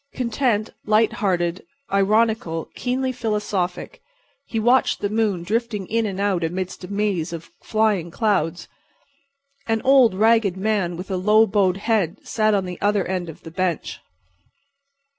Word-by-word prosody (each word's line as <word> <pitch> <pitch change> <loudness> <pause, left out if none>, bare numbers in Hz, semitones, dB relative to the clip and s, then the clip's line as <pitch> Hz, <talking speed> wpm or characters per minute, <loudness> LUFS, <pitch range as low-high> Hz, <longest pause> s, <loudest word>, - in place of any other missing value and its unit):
Content, 235 -3 0
light 215 +1 +3
hearted, 175 -3 -1 0.3
ironical, 205 -4 +1
keenly 260 +1 -1
philosophic, 210 - -3 0.5
he 225 - -2
watched 245 +4 +3
the 205 - -2
moon 210 -5 0
drifting 215 0 -2
in 225 +3 0
and 195 -1 -5
out 195 -4 0
amidst 180 +3 -4
a - - -6
maze 200 -5 -1
of 170 -1 -8
flying 215 -6 +1
clouds. 185 -4 0 1.0
An 225 -1 +1
old, 260 -6 +5
ragged 220 -2 +3
man 190 -4 -1
with 185 +3 -7
a 190 - 0
low 210 +4 +5
bowed 195 -3 +1
head 205 -4 0
sat 215 -1 +1
at 195 -2 0
the 180 -1 -7
other 205 -2 +2
end 180 -2 -3
of 160 - -11
the 165 - -9
bench. 180 -1 -2
205 Hz, 145 wpm, -22 LUFS, 180-220 Hz, 1.0 s, old